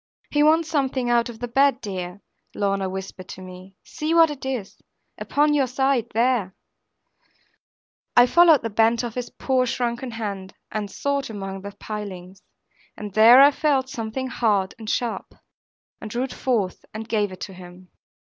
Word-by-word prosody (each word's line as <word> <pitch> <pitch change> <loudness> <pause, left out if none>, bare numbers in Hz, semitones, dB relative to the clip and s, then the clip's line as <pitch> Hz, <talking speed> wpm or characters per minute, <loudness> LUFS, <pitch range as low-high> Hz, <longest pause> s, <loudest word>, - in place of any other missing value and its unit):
'He 295 - +2
wants 315 +2 +4
something 265 -5 0
out 235 0 +2
of 235 - -9
the 245 - -5
bed, 270 +2 +3
dear,' 190 -3 -6 0.3
Lorna 195 -1 0
whispered 190 -1 -7
to 185 - -9
me; 185 +1 -12
'see 310 +2 -3
what 330 -2 +6
it 275 -2 -7
is, 245 -7 -5 0.4
upon 295 +1 +1
your 280 -3 +2
side, 265 -1 +1
there.' 230 -5 +1 1.6
I 245 - +9
followed 330 0 +5
the 230 - -3
bent 225 +3 +2
of 235 -2 -4
his 250 0 -5
poor 255 -1 0
shrunken 240 +1 -2
hand, 200 -5 -6 0.2
and 210 -1 -3
sought 280 +4 -2
among 195 -2 -6
the 200 +1 -8
pilings; 195 -4 -8 0.6
and 210 -2 -7
there 230 +5 +8
I 285 - +7
felt 280 -3 0
something 245 -1 -4
hard 210 -6 0
and 220 -1 -7
sharp, 240 0 -3 0.7
and 215 - -6
drew 240 +4 -2
it 265 - -5
forth 215 -8 -1
and 220 0 -6
gave 210 -3 0
it 185 - -11
to 195 - -6
him. 180 0 -13
230 Hz, 165 wpm, -23 LUFS, 195-265 Hz, 1.6 s, I